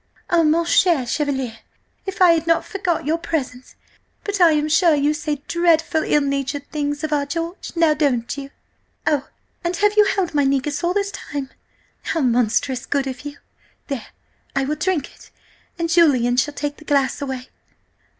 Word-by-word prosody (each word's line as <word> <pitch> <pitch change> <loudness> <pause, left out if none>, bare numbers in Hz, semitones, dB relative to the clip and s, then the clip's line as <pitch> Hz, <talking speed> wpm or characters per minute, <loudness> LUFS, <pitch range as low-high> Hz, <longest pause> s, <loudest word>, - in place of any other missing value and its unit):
Oh, 340 -1 +4
mon 325 +2 +3
cher 335 -6 +3
Chevalier! 265 -4 -2 0.5
if 380 -1 +1
I 355 - +8
had 330 -1 +1
not 330 0 +2
forgot 370 -7 -2
your 320 +3 0
presence! 260 -7 -4 0.5
But 405 -2 -2
I 335 -2 +7
am 300 0 +1
sure 325 +1 +4
you 290 +1 +2
say 300 -2 -3
dreadful 330 -2 +2
ill 295 - +2
natured 280 0 -2
things 290 0 -2
of 310 -1 -1
our 285 -1 0
George, 330 +4 -4
now 330 -2 +4
don't 270 -6 0
you? 280 -1 -7 0.6
Oh, 290 -2 0 0.3
and 345 +1 -1
have 415 +2 +2
you 420 - +7
held 385 -4 0
my 290 -1 +3
negus 275 +2 0
all 350 +2 +1
this 400 -1 0
time? 280 -7 -6 0.5
How 330 - -1
monstrous 250 +1 +1
good 280 -1 0
of 260 -1 -5
you! 290 0 -7 0.5
There, 275 -5 -4 0.5
I 275 -1 +1
will 300 +3 -1
drink 335 -2 -1
it, - - -18 0.5
and 335 0 -1
Julian 285 -8 +4
shall 290 +3 +1
take 290 0 -3
the - - -14
glass 280 -3 +1
away 265 -2 -5
295 Hz, 180 wpm, -21 LUFS, 275-335 Hz, 0.6 s, I